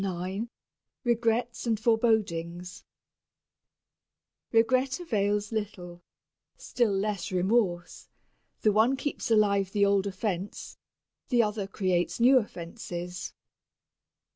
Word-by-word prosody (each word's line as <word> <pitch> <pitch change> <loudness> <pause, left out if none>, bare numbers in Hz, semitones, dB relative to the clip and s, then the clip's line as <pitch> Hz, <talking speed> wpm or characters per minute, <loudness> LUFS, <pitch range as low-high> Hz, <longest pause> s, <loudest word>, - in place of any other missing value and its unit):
IX 190 +4 -3 0.6
REGRETS 235 0 0
AND 225 -2 +1
FOREBODINGS 195 -7 0 1.7
Regret 255 +5 +2
avails 210 - 0
little 185 -5 -5 0.6
still 240 -4 0
less 195 -2 -2
remorse 185 -1 0 0.5
the 215 - +4
one 225 +6 +3
keeps 290 -2 -3
alive 200 -3 +3
the 200 -1 +3
old 200 0 +2
offense, 195 -1 -4 0.5
the 240 -2 +4
other 210 -2 -2
creates 185 -2 -1
new 255 +3 +6
offenses. 175 -3 -6
205 Hz, 90 wpm, -28 LUFS, 185-230 Hz, 1.7 s, new